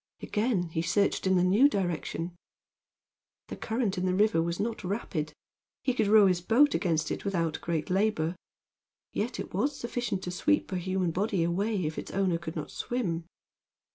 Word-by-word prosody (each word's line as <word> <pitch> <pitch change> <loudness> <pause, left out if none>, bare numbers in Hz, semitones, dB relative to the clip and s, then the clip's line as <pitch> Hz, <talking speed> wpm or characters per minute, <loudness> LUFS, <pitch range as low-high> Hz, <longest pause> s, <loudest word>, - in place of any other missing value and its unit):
Again 210 -6 0
he 160 0 -1
searched 190 +3 +1
in 190 - +4
the 180 - +4
new 210 +10 +5
direction. 175 - -2 1.1
The - - -4
current 220 -5 -1
in 185 - 0
the 185 - +1
river 205 -4 +3
was 170 +1 -2
not 220 0 -2
rapid. 180 -5 -2 0.5
He 255 - +1
could 220 -4 +1
row 210 0 +7
his 180 -2 +2
boat 255 +10 +4
against 165 -3 0
it - - -3
without 170 -5 -1
great 165 -1 -2
labor. 185 -4 +1 0.8
Yet 235 +4 -2
it - - -6
was 270 +10 0
sufficient 235 -5 -3
to 180 - -3
sweep 295 +10 +1
a 185 - -1
human 185 -1 0
body 195 0 0
away 190 +2 0
if 155 +1 -3
its - - -7
owner 185 -3 +1
could 165 -1 -6
not 155 -3 -5
swim. 175 -10 -2
185 Hz, 175 wpm, -29 LUFS, 170-215 Hz, 1.1 s, row